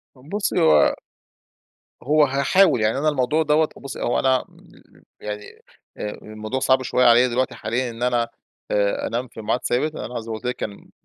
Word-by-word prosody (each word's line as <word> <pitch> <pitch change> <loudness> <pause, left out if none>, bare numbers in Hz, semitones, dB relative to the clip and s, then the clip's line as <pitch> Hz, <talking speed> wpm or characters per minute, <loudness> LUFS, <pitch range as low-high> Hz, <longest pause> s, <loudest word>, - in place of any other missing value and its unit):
طَب 130 +3 -17
بُصّي، 205 +2 -1
هو 75 -1 +5 1.1
هو 150 +3 +4
هاحاول. 140 +3 +3
يعني 110 +4 +1
أنا 155 +2 +1
الموضوع 145 +2 +1
دَوّة 155 0 +2
بُصّي، 140 - -8
هو 120 - +1
أنا 130 -1 +2
م - - -22 0.2
يعني 105 0 -5 0.5
آآ 105 - -4
الموضوع 110 +4 -5
صعب 130 0 +3
شوية 125 0 +1
عليّا 120 +1 +6
دلوقتي 125 +1 -1
حاليًا 120 +2 -2
إن 115 +1 -9
أنا 120 -1 +1 0.4
آآ 100 -1 0
أنام 120 +3 -3
في 115 - -11
معاد 110 +3 -1
ثابت 150 +6 0
لإن - - -6
أنا 125 0 -5
زي 115 +1 -9
ما 110 - -2
قُلت 110 +3 -8
لِك 125 - -1
كان 100 -2 -7
125 Hz, 190 wpm, -22 LUFS, 115-135 Hz, 1.1 s, عليّا